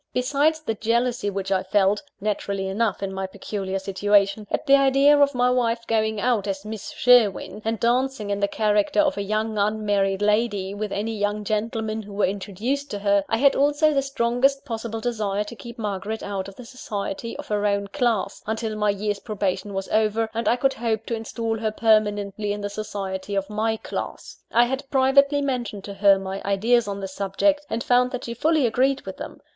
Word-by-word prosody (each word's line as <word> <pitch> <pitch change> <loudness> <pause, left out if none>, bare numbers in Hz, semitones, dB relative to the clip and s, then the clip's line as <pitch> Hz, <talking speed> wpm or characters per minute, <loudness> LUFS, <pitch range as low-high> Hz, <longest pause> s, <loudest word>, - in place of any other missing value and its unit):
Besides 290 +5 +1
the 260 -7 -2
jealousy 235 +1 0
which 195 -1 -4
I 190 -1 +2
felt 195 +1 +2 0.2
naturally 200 -1 -2
enough, 205 +1 -1
in 195 -1 -3
my 190 0 -3
peculiar 195 0 -4
situation 200 +2 +1
at - - -2
the 275 -1 +7
idea 275 +1 +5
of 285 -1 +3
my 250 0 +3
wife 235 -2 0
going 220 -1 0
out 225 -3 +1
as 195 0 -3
Miss 215 -1 -6
Sherwin, 230 -4 +3
and 225 0 -1
dancing 240 -2 0
in 200 - -1
the 200 - +2
character 210 +4 +1
of 295 -2 +3
a - - -3
young 215 +1 -1
unmarried 205 -2 +1
lady 205 -2 +1
with 210 0 -4
any 220 +2 -2
young 205 0 -1
gentlemen 220 +1 -2
who 205 -1 -11
were 200 - +2
introduced 210 +9 -3
to 205 - -4
her, 200 0 +2
I 225 - +1
had 275 +3 +4
also 290 +2 +3
the 275 - +2
strongest 270 +1 +1
possible 225 -2 -4
desire 210 -4 -1
to 210 +3 -9
keep 235 +3 -10
Margaret 210 0 -4
out 195 -2 -4
of 195 - -11
the 250 - -11
society 230 -2 -5
of - - -8
her 210 0 +1
own 200 0 0
class, 230 0 -1
until 220 0 -2
my 210 0 +1
year's 205 0 -1
probation 200 -2 -2
was 195 0 -3
over, 220 +1 +1
and 230 +1 -2
I - - +4
could 270 +2 +1
hope 225 -1 -2
to 230 - -2
instal 225 0 -3
her 220 0 0
permanently 210 -2 +1
in 205 - -5
the 205 0 -4
society 200 -2 -4
of 195 +1 -2
my 220 +1 0
class. - - -6
I 235 +1 +5
had 265 +2 -4
privately 280 +2 +4
mentioned 240 -7 -3
to 200 - -7
her 200 0 +5
my 195 0 -5
ideas 220 +4 +2
on 200 0 -4
this 190 -1 -6
subject, 290 +11 0
and 230 +2 -2
found 250 0 +3
that 255 0 -5
she 235 - -4
fully 310 +3 +2
agreed 260 +4 +2
with - - -8
them. - - -8
215 Hz, 200 wpm, -24 LUFS, 200-245 Hz, 0.2 s, the